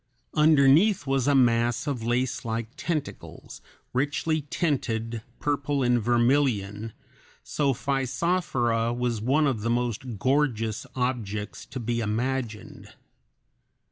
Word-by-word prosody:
Underneath 155 +5 +5
was 135 -1 0
a 145 - +4
mass 120 -1 +3
of 140 -4 -2
lacelike 120 -1 -1
tentacles, 160 -4 -5 0.3
richly 145 +4 0
tinted, 115 -9 -1 0.2
purple 145 -1 0
and 120 -1 +2
vermilion, 120 -3 +1 0.5
so 140 -2 0
Physophora 130 -3 0
was 120 -3 -1
one 140 +7 +2
of 130 -7 0
the 115 - -1
most 120 -1 -2
gorgeous 120 -3 0
objects 110 -5 -3
to 130 - -6
be 120 0 -2
imagined. 115 +1 -3
125 Hz, 105 wpm, -26 LUFS, 115-140 Hz, 0.5 s, Underneath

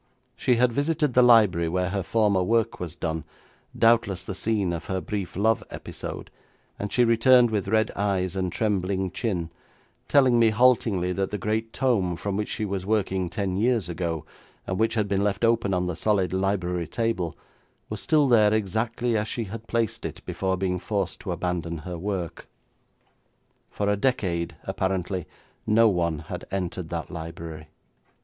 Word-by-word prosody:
She 125 - +2
had 120 0 +3
visited 145 0 +1
the 125 - +6
library 105 -9 +5
where 90 +2 0
her 100 +1 -1
former 105 0 +2
work 115 +4 +1
was 85 -2 -5
done, 80 -1 -3 0.5
doubtless 115 -5 +3
the - - -5
scene 100 -2 0
of 85 0 -5
her 95 -1 -2
brief 95 -2 -4
love 110 +4 +2
episode, - - -7 0.5
and 100 - -4
she 125 - +4
returned 120 +1 +5
with 105 -3 -1
red 110 +2 +2
eyes 95 -2 0
and 95 -2 -1
trembling 95 -2 0
chin, 90 -7 -2 0.6
telling 130 -4 +4
me 115 -1 +5
haltingly 110 -5 +3
that 95 +1 -1
the 105 - -3
great 110 +3 -2
tome 110 -11 +1
from 100 +3 -3
which 105 +1 -2
she 110 - -2
was 100 -2 -3
working 95 -3 0
ten 95 0 -2
years 110 -4 +1
ago, 85 -2 -3 0.4
and 95 - -3
which 110 +1 +2
had 105 -2 +1
been 100 0 +1
left 105 +2 +1
open 115 -3 +2
on 90 -1 +1
the 90 -2 -2
solid 95 -3 +1
library 90 -3 -1
table, 115 -8 -2 0.5
was 105 -1 -5
still 150 -3 +3
there 110 -4 +5
exactly 110 +3 -1
as 105 0 0
she 115 - -2
had 110 +2 -8
placed 115 -2 -1
it - - -6
before 95 -1 -1
being 90 -1 -1
forced 100 0 -2
to 95 - -5
abandon 85 -1 -2
her 85 +2 -6
work. 95 -3 -4 1.2
For 100 - -2
a 105 - +3
decade 90 -8 -1
apparently 95 -2 -2 0.4
no 115 +2 +5
one 85 -4 0
had - - -6
entered 90 -3 -3
that 85 0 -4
library. 80 -2 -7
100 Hz, 170 wpm, -25 LUFS, 90-110 Hz, 1.2 s, the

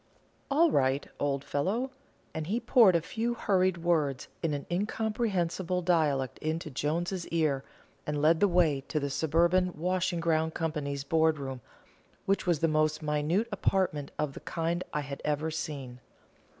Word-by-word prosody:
"All 310 +3 +4
right, 135 - +1
old 140 -1 0
fellow;" 200 - -1 0.4
and 160 -1 -4
he 220 +6 0
poured 235 -5 +5
a 170 - +3
few 230 +6 -2
hurried 185 -4 +2
words 155 -5 0
in 165 - 0
an 140 - -5
incomprehensible 190 -3 -1
dialect 150 -7 +1
into 155 0 -3
Jones's 170 +7 -2
ear, 155 -5 0 0.4
and 150 -1 -1
led 160 +2 +4
the 205 - +5
way 170 -6 +3
to 155 - -1
the 140 -1 -3
Suburban 170 +5 +2
Washing 180 +1 0
ground 160 -1 +1
Company's 145 -4 -2
board 160 +1 +2
room, 135 -3 -5 0.6
which 195 -1 0
was 170 -4 +2
the 165 - +4
most 155 0 +1
minute 150 +8 +1
apartment 185 -7 0
of 150 -2 -1
the - - -8
kind 170 +2 -2
I 150 - -1
had 140 -1 -7
ever 150 +2 -1
seen. 140 -5 -5
160 Hz, 155 wpm, -29 LUFS, 145-185 Hz, 0.6 s, poured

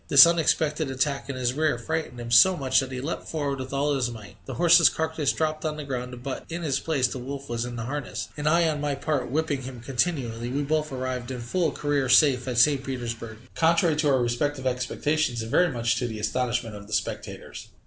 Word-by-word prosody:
This 140 -1 +10
unexpected 160 -2 +1
attack 135 +1 -1
in 140 - -3
his 125 -1 0
rear 150 -3 +1
frightened 155 -1 -4
him 120 0 -6
so 180 +11 +7
much 135 -2 +2
that 135 -1 -3
he 130 - -4
leapt 145 +6 -4
forward 145 -4 -2
with 130 0 -6
all 140 +1 0
his 130 -3 0
might, 110 -4 -10
the 135 - -5
horse's 170 +3 +6
carcass 160 -3 -1
dropped 155 -1 -2
on 155 -1 -2
the 150 - -5
ground, 125 -2 -5
but 135 0 -4
in 170 +1 -5
his 140 -4 0
place 140 -6 +1
the 130 - -6
wolf 140 +2 -6
was 120 0 -2
in 120 0 -6
the 115 - -4
harness, 145 +4 -4
and 150 0 0
I 170 +1 +3
on 150 -2 -1
my 145 -1 -1
part 145 -1 -2
whipping 150 0 -1
him 130 -1 -8
continually, 120 -2 -2
we 140 +3 -1
both 155 +1 -1
arrived 130 -2 -4
in 130 -1 -5
full 160 +8 0
career 145 -3 -1
safe 130 -1 +5
at 125 -2 -2
St. 135 +2 +4
Petersburg, 115 -4 -5 0.2
contrary 165 0 +3
to 150 -1 +2
our 130 -3 +3
respective 130 +3 -1
expectations, 125 0 -1
and 115 - -7
very 175 -2 +3
much 120 -2 0
to 125 - -1
the 110 -2 -6
astonishment 120 +1 -2
of 100 0 -10
the 110 - -8
spectators. 100 -4 -4
135 Hz, 225 wpm, -26 LUFS, 125-155 Hz, 0.2 s, This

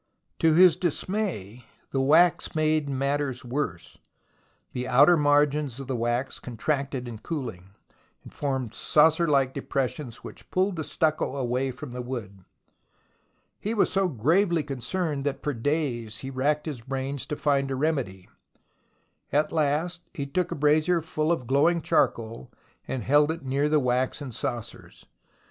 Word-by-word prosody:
To 160 -1 +4
his 180 -1 +7
dismay 170 - -2 0.3
the 135 - +1
wax 170 +5 +4
made 155 -1 +1
matters 140 -1 -1
worse. 120 - -4 0.7
The 125 0 -4
outer 145 +7 +6
margins 145 -3 +2
of 135 - -6
the 130 0 -3
wax 120 +3 -1
contracted 135 +1 -2
in 115 -3 -7
coohng, 110 - -6 0.5
and - - -13
formed 130 -5 -2
saucer 160 +2 +3
like 135 -3 +2
depressions 135 -2 -3
which - - -11
pulled 190 +1 +1
the 155 - -2
stucco 155 -3 0
away 130 0 -1
from 130 +1 -8
the 125 +1 -5
wood. 110 -7 -6 1.2
He 215 +3 -2
was 210 - +2
so 195 -1 +2
gravely 165 - +2
concerned 145 +2 -3
that 145 - -2
for 145 - -1
days 120 -4 -1
he 135 - -5
racked 145 +3 0
his 145 -7 -5
brains 135 +2 -4
to 150 - -3
find 140 -2 +1
a 135 - -1
remedy. 130 - -2 1.0
At 150 +2 +2
last, 160 +3 0
he 140 -5 -3
took 180 +5 -1
a - - -2
brazier 155 +4 +3
full 155 0 -1
of 145 -7 -1
glowing 145 +7 +3
charcoal, 115 - 0 0.4
and 130 -4 -3
held 145 +4 +4
it 160 -3 -4
near 140 +3 +1
the 155 0 +4
waxen 130 +1 -1
saucers. 120 0 -6
140 Hz, 150 wpm, -26 LUFS, 125-155 Hz, 1.2 s, his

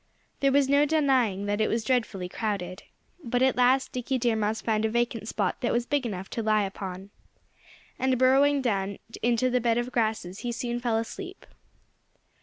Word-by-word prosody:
There 275 -1 +3
was 280 0 +3
no 280 +1 +4
denying 260 -10 +2
that 205 +1 -1
it 215 - +3
was 225 0 0
dreadfully 220 -7 -1
crowded. 185 -2 -4 0.4
But 245 +1 0
at 265 - +3
last 255 +2 +3
Dickie 255 +1 -2
Deer 240 -2 +1
Mouse 220 0 -1
found 215 -1 0
a 220 - +2
vacant 235 -1 -1
spot 200 -4 -2
that 240 - 0
was 235 0 0
big 280 -2 0
enough 190 -3 -5
to 230 - -2
lie 215 -1 +2
upon. 190 0 -6 0.9
And 260 -1 +2
burrowing 270 +2 +4
down 200 -4 -1 0.2
into 240 +2 +2
the 250 0 +2
bed 230 0 +2
of 240 +1 -2
grasses 215 -6 -1
he 240 - -3
soon 240 0 -3
fell 240 -2 0
asleep. 370 - -6
235 Hz, 185 wpm, -27 LUFS, 215-255 Hz, 0.9 s, no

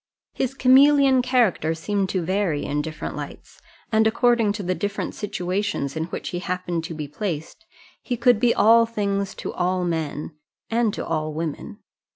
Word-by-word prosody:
His 265 0 -2
chameleon 270 0 +5
character 235 -11 +1
seemed 195 +3 -1
to 185 -2 -1
vary 185 -4 0
in 145 +1 -1
different 155 +1 -6
lights, - - -9 0.3
and 220 0 +4
according 230 -1 +3
to 205 -1 -5
the 185 0 0
different 200 +4 -3
situations 185 -7 -2
in 160 0 -1
which 170 - -5
he 175 - -3
happened 180 -2 -3
to 165 - -6
be 150 -1 -5
placed. 170 - -5 0.3
He 245 - -3
could 240 -1 +4
be 240 0 +4
all 230 +1 +5
things 200 -3 -2
to - - -6
all 180 0 0
men 160 -3 -3 0.4
and 230 -1 +2
to - - -4
all 155 -1 -2
women. 165 +7 -5
195 Hz, 170 wpm, -23 LUFS, 165-230 Hz, 0.4 s, chameleon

